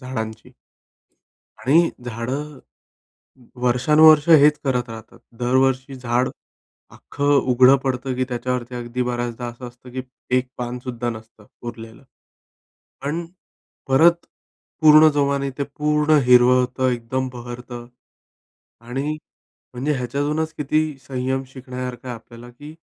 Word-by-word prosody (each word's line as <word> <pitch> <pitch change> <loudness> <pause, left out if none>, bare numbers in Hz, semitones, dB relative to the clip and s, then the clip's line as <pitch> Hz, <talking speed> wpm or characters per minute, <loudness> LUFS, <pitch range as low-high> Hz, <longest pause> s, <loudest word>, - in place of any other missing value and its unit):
झाडांची? 110 -4 -6 1.1
आणि 165 +6 +3
झाडं 130 +5 -5 1.0
वर्षानुवर्षे 150 +6 +5
हेच 150 +1 +5
करत 125 -3 0
राहतात. 110 -1 -11 0.2
दरवर्षी 130 +2 +1
झाड 125 0 0 0.6
अख्खं 145 0 -2 0.2
उघडं 130 +2 +6
पडतं, 130 0 -2
की 130 - 0
त्याच्यावरती 125 0 -3
अगदी 120 +1 -3
बऱ्याचदा 120 0 -3
असं 120 +1 -8
असतं, 125 +1 -16
की 130 0 -4 0.3
1 125 0 0
पान 125 0 -4
सुद्धा 120 -1 -3
नसतं 110 -1 -12 0.2
उरलेलं. 115 0 -9 1.0
पण 160 +5 -3 0.6
परत 170 +6 +4 0.6
पूर्ण 155 0 +8
जोमाने 140 -1 0
ते 140 - 0
पूर्ण 150 0 +3
हिरवं 125 0 +6
होतं, 130 +1 0
एकदम 125 +2 -2
बहरतं 120 0 -8 0.9
आणि 135 +6 -3 0.6
म्हणजे, 135 +5 -1
ह्याच्यातूनच 145 +5 -2
किती 150 +1 +1 0.3
संयम 130 0 -2
शिकण्यासारखं 125 -1 -7
आहे 125 - -4
आपल्याला, 115 +1 -14
की 145 +5 -12
125 Hz, 115 wpm, -21 LUFS, 120-140 Hz, 1.1 s, पूर्ण